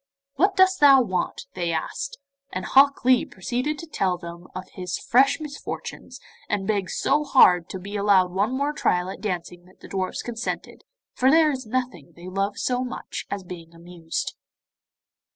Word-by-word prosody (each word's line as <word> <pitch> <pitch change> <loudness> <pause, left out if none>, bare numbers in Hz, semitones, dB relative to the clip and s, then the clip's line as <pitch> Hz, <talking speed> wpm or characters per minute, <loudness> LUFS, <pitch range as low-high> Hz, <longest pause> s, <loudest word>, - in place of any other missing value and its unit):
'What 385 +8 +2
dost 375 0 +4
thou 275 -2 +8
want?' 185 -5 -3
they 175 -2 -2
asked; - - -3 0.3
and 185 0 -4
Hok 275 -1 +4
Lee 255 -1 +5
proceeded 250 +10 -3
to 330 - -8
tell 190 - -1
them 170 0 -10
of 185 0 -6
his 180 -1 -4
fresh 270 +5 +3
misfortunes, 295 -2 -7 0.3
and 200 -2 -1
begged 200 -3 -1
so 295 +2 +1
hard 180 - +5
to - - -5
be 200 +3 -8
allowed 195 -3 +3
one 200 +6 0
more 280 +3 -1
trial 180 -10 0
at - - -10
dancing 175 -3 -4
that 185 - -22
the - - -11
dwarfs 190 -1 -3
consented, 240 0 -5 0.3
for 260 - +3
there 315 +1 +5
is 260 -4 -5
nothing 245 - -3
they 175 +1 -11
love 195 +2 -2
so 250 0 0
much 255 - -6
as 200 -1 -4
being 170 -2 -10
amused. 170 -1 -5
200 Hz, 170 wpm, -24 LUFS, 180-270 Hz, 0.3 s, thou